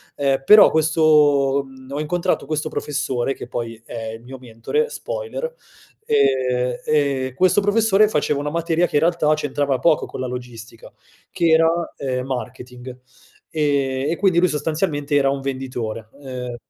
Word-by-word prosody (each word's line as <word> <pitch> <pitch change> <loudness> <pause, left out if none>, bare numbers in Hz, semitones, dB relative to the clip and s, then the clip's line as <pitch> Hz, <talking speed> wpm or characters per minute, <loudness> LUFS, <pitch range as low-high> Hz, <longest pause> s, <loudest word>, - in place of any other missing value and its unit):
ehm, 135 -1 0
però 210 0 +8
questo 150 -3 +3
mhmm, 130 0 -15
ho 145 - -3
incontrato 170 +3 -1
questo 155 0 -3
professore, 135 -4 -2
che - - -9
poi 115 -2 -5
è 115 -1 -6
il 115 - -10
mio 130 +2 -10
mentore, 125 - -2
spoiler, - - -5 0.5
ehm, 125 - +1
e 140 -4 0
questo 185 +4 +3
professore 210 0 +3
faceva 150 -5 0
una 145 +1 -3
materia 170 +1 +1
che, 150 - -1
in - - +2
realtà, 165 -2 +2
c'entrava 145 -3 -1
poco 155 +3 +2
con - - -9
la 130 - -2
logistica 120 -2 -9 0.4
che 170 - 0
era, 160 0 +5 0.3
ehm, 130 -1 -3
marketing. 125 -1 -7 0.6
Ehm, 140 -2 0
e - - 0
quindi 185 -4 +3
lui 180 - +4
sostanzialmente 150 -1 -2
era 140 -1 +3
un 140 0 -1
venditore, 125 -5 -5
ehm, 125 -2 -6
140 Hz, 155 wpm, -21 LUFS, 130-160 Hz, 0.6 s, però